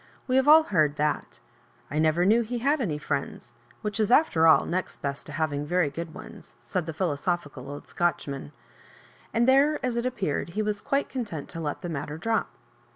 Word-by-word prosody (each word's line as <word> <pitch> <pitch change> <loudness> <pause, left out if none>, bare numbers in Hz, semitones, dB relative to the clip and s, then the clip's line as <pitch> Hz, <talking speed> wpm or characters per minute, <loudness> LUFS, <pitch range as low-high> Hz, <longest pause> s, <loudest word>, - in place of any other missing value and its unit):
We 255 - +1
have 265 +1 +3
all 315 +1 +9
heard 155 - +1
thai 150 0 +1 0.7
I 150 - 0
never 160 +3 +3
knew 220 +4 +5
he 240 +2 -3
had 280 +5 +1
any 165 -10 -1
friends; 140 -4 -4 0.3
which 210 +1 -2
is, 215 - +2
after 240 - +4
all, 160 - +6
next 185 +2 -3
best 140 0 -3
to - - -8
having 150 -2 -1
very 170 -1 +1
good 165 +2 -6
one8»" - - -12
said 155 +8 -3
the - - -2
philosophi<»l 150 -4 -2
old 145 0 -8
Sootcl^ 175 -3 -1
man; 135 - -6 0.8
and 235 +2 +2
there, 280 +3 +4
as 245 -2 -1
it 235 +1 0
appeared, 190 - -2
he 215 - +2
was 210 -1 -2
quite 275 +1 0
content 210 - -5
to 165 - -7
let 150 +2 -4
the - - -3
matter 150 -1 -4
drop. 225 +5 0
175 Hz, 200 wpm, -27 LUFS, 150-230 Hz, 0.8 s, all